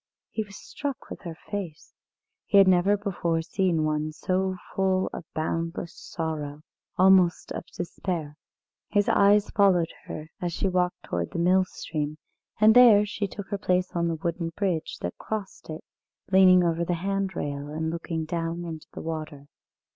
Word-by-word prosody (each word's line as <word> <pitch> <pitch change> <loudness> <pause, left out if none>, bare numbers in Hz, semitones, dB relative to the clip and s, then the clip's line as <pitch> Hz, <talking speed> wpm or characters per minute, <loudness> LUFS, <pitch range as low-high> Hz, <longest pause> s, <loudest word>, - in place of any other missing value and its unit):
He 220 - -2
was 200 -1 -13
struck 285 -2 -6
with - - -7
her 170 -4 -7 0.2
face. 185 -7 -5 0.5
He 200 - +4
had 195 -1 +8
never 185 +3 +4
before 170 -5 -1
seen 175 -2 +1
one 155 0 -1
so 185 +4 -1 0.2
full 190 -1 +1
of 165 - -8
boundless 165 +1 -2
sorrow 155 -2 -5 0.3
almost 185 -2 +4
of - - -5
despair. 170 -3 -4 0.5
His 205 -1 +2
eyes 205 +1 +4
followed 185 -5 +3
her 155 +1 -7
as 175 -1 -2
she 195 - 0
walked 180 -1 0
towards - - -3
the - - -3
mill 185 +2 +4
stream, 155 -4 -4 0.4
and 215 +1 +7
there 225 -4 +8
she 205 0 -3
took 200 0 -8
her 200 - -2
place 185 -2 +1
on 170 0 +1
the 165 - 0
wooden 170 +1 -2
bridge 185 -6 -1
that 90 - -5
crossed 210 -6 -5
it, 155 0 -6 0.5
leaning 185 -1 +7
over 170 0 +1
the 175 +1 0
handrail, 185 -6 -2
and 160 +1 -2
looking 165 -1 -3
down 170 +1 -3
into 160 -2 -7
the - - -6
water. 155 -3 -6
175 Hz, 160 wpm, -26 LUFS, 160-195 Hz, 0.5 s, had